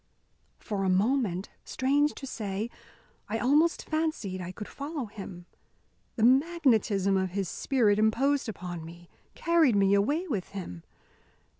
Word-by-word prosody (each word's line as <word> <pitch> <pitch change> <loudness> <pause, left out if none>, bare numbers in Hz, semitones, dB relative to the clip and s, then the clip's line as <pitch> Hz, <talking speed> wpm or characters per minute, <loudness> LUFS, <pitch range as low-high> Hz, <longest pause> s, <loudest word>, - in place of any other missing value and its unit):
For 200 -2 -3
a 190 - +1
moment, 200 -1 +1
strange 285 +3 +1
to 275 - -7
say, 215 -2 -4 0.6
I 220 - -1
almost 295 +8 +2
fancied 310 - -2
could 210 - -7
follow 285 -1 -5
him. 195 -4 -9 0.7
The 220 - -1
magnetism 245 - +3
of 190 0 0
his 195 -2 -1
spirit 215 - +1
imposed 260 +5 +2
upon 175 -4 -6
me, 170 +1 -12 0.3
carried 330 -8 +3
me 195 0 +4
away 290 - +1
with 210 - -2
him. 90 - -6
220 Hz, 130 wpm, -28 LUFS, 195-280 Hz, 0.7 s, me